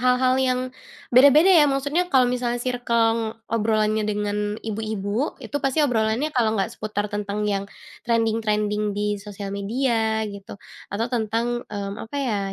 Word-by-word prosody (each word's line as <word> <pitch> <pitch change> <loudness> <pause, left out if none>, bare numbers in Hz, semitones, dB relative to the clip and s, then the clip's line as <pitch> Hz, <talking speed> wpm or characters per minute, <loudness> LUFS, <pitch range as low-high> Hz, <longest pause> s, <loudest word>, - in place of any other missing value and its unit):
hal-hal 255 +1 +3
yang, 255 -1 +1 0.5
beda-beda 285 +9 +7
ya 295 - +5
maksudnya 285 +6 0
kalau 260 -7 +4
misalnya 245 -1 -1
circle 230 -2 0 0.2
obrolannya 215 -1 +1
dengan 210 0 -1
ibu-ibu 215 +3 -2
itu 230 - -10
pasti 275 +3 +2
obrolannya 235 +3 0
kalau 225 -5 +1
nggak 195 - -1
seputar 210 -1 -3
tentang 205 0 -2
yang, 200 0 -2 0.4
trending-trending 210 -2 0
di 205 0 -1
sosial 200 -1 -7
media 220 +1 0
gitu, 200 -1 -8 0.3
atau 215 +4 -2
tentang, 235 +1 -1
mmm, 200 0 -5
apa 225 +6 -7
ya 250 -7 0
220 Hz, 140 wpm, -23 LUFS, 210-250 Hz, 0.5 s, beda-beda